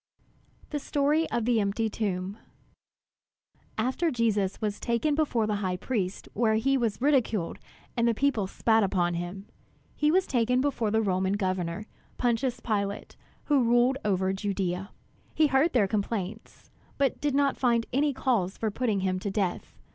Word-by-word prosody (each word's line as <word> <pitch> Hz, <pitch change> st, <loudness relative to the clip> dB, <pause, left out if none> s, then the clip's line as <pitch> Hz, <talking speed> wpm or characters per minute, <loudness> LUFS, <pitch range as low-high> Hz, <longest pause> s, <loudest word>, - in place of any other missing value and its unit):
THE 295 Hz, -, -1 dB
STORY 295 Hz, +3 st, +1 dB
OF 235 Hz, -, -1 dB
THE 240 Hz, -2 st, +3 dB
EMPTY 205 Hz, +2 st, 0 dB
TOMB 200 Hz, -2 st, -3 dB, 1.4 s
After 260 Hz, +9 st, +1 dB
Jesus 215 Hz, -7 st, 0 dB
was 210 Hz, -2 st, -2 dB
taken 235 Hz, +6 st, 0 dB
before 285 Hz, -7 st, +1 dB
the 210 Hz, -1 st, -1 dB
high 185 Hz, -3 st, -2 dB
priest 195 Hz, -3 st, -3 dB
where 220 Hz, 0 st, +2 dB
he 270 Hz, +5 st, +2 dB
was 230 Hz, -6 st, 0 dB
ridiculed 245 Hz, -, +1 dB, 0.4 s
and 235 Hz, 0 st, +2 dB
the 230 Hz, -, +2 dB
people 245 Hz, -6 st, +1 dB
spat 225 Hz, +3 st, +2 dB
upon 180 Hz, -3 st, +1 dB
him, 175 Hz, +3 st, -5 dB, 0.5 s
he 300 Hz, -, +2 dB
was 370 Hz, +4 st, +3 dB
taken 250 Hz, 0 st, +1 dB
before 255 Hz, -5 st, 0 dB
the 220 Hz, +1 st, +2 dB
Roman 190 Hz, -1 st, +1 dB
Governor, 185 Hz, -1 st, -2 dB, 0.3 s
Pontius 245 Hz, +1 st, 0 dB
Pilate, 200 Hz, -3 st, -2 dB, 0.3 s
who 285 Hz, -4 st, +3 dB
ruled 240 Hz, +3 st, +3 dB
over 190 Hz, -2 st, +1 dB
Judea. 195 Hz, -1 st, -2 dB, 0.5 s
He 315 Hz, -, +4 dB
heard 285 Hz, +3 st, +3 dB
their 220 Hz, -6 st, +3 dB
complaints, 210 Hz, 0 st, -4 dB, 0.3 s
but 275 Hz, -2 st, 0 dB
did 290 Hz, -2 st, 0 dB
not 280 Hz, -1 st, +2 dB
find 235 Hz, -3 st, +2 dB
any 290 Hz, +3 st, +2 dB
cause 235 Hz, -8 st, 0 dB
for 220 Hz, -1 st, -1 dB
putting 215 Hz, -3 st, 0 dB
him 185 Hz, -1 st, 0 dB
to 200 Hz, -, -3 dB
death. 195 Hz, -3 st, -2 dB
220 Hz, 155 wpm, -28 LUFS, 195-260 Hz, 1.4 s, He